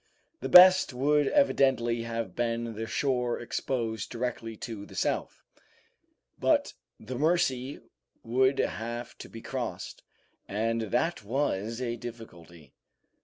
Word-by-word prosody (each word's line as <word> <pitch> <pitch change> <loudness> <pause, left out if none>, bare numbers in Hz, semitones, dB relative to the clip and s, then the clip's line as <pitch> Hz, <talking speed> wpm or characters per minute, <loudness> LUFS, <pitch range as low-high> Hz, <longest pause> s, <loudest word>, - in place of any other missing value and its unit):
The - - -4
best 185 -4 +8
would 145 +2 +2
evidently 130 - +2
have 115 0 -4
been 115 -1 -1
the 110 +1 -5
shore 125 -3 0
exposed 115 -3 -3
directly 115 -2 -4
to 110 -3 -6
the - - -13
south; - - -2 1.0
but - - +2 0.3
the 125 +3 -6
Mercy 145 -5 +1 0.4
would 130 +3 +2
have 120 +2 -3
to - - -9
be 115 - -10
crossed, 120 -9 -5 0.5
and 115 +3 -1
that 125 - 0
was 115 -2 -1
a 120 -2 -2
difficulty. 85 - -11
120 Hz, 120 wpm, -28 LUFS, 115-130 Hz, 1.0 s, best